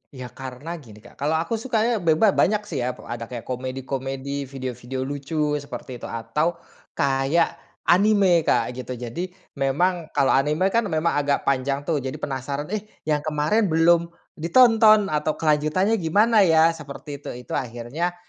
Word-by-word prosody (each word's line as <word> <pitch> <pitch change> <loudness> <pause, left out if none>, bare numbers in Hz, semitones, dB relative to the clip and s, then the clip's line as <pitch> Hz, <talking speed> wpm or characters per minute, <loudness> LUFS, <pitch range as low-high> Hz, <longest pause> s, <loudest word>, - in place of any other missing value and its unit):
Iya, 125 -2 -8
karena 130 +3 -8
gini 110 -6 -15
Kak, 120 - -17
kalau 150 +3 +1
aku 170 +8 -1
sukanya 230 -1 0
beba 170 +4 +4
banyak, 210 +3 +2
sih, 155 -9 -5
ya. 125 0 -2
Ada 115 -2 -7
kayak 120 -1 -7
komedi-komedi, 135 +2 -4
video-video 130 -1 -5
lucu 145 +3 -5 0.2
seperti 130 -3 -8
itu. - - -7
Atau 115 +9 -1 0.4
kayak 140 +4 +1 0.2
anime 195 -1 +4
Kak, - - +2
gitu. 125 0 -6
Jadi 120 +9 -5 0.3
memang 165 +5 +1
kalau 135 - +3
anime 150 +8 +2
kan, 230 -1 +1
memang 160 -1 +1
agak 145 -1 0
panjang, 140 +1 0
tuh, 150 0 0
jadi 130 0 -5
penasaran, 140 +4 -4
"Eh, 215 0 -3 0.2
yang 150 -1 +1
kemarin 155 +8 +1
belum 170 +1 +4 0.3
ditonton 215 +2 +5
atau 150 0 0
kelanjutannya 160 +8 +1
gimana 210 +7 +3
ya?" 165 -4 +5
seperti 145 -2 -8
itu. - - -8
Itu - - -14
akhirnya, 125 +9 -3
150 Hz, 155 wpm, -23 LUFS, 130-175 Hz, 0.4 s, ditonton